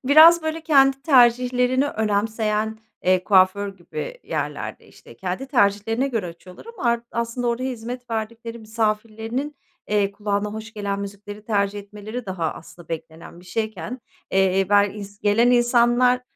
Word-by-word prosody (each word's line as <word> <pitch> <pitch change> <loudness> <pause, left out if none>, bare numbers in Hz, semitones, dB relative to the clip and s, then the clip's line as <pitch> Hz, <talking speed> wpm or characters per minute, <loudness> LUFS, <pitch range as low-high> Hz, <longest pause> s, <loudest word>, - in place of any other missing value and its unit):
Biraz 315 +4 +8
böyle 315 +1 -2
kendi 275 -4 +4
tercihlerini 250 -1 +4
önemseyen, 220 -1 -1 0.3
eee, 185 0 +3
kuaför 195 +1 +4
gibi - - -7
yerlerde - - -4
işte - - -16
kendi 190 +8 -4
tercihlerine 225 +1 +2
göre 225 -8 -2
açıyorlar 175 - -12
ama 465 - -9
ar 235 - 0
aslında 235 +1 -2
oraya 255 +3 -1
hizmet 245 +1 -7
verdikleri 230 +1 -4
misafirlerinin, 225 +5 -2 0.3
eee, 205 -1 +1
kulağına 205 0 -2
hoş 220 +1 -7
gelen 200 -1 -3
müzikleri 205 +1 -8
tercih 205 -2 0
etmeleri 210 +3 -8
daha 170 -4 -2
aslında 170 0 -13
beklenen 165 +1 -8
bir - - -17
şeyken, 215 +4 -4 0.3
eee, 190 0 +2
ber 205 0 +5
ins 200 0 -9
gelen 220 +4 +3
insanlar 240 +1 +4
220 Hz, 140 wpm, -23 LUFS, 200-245 Hz, 0.3 s, Biraz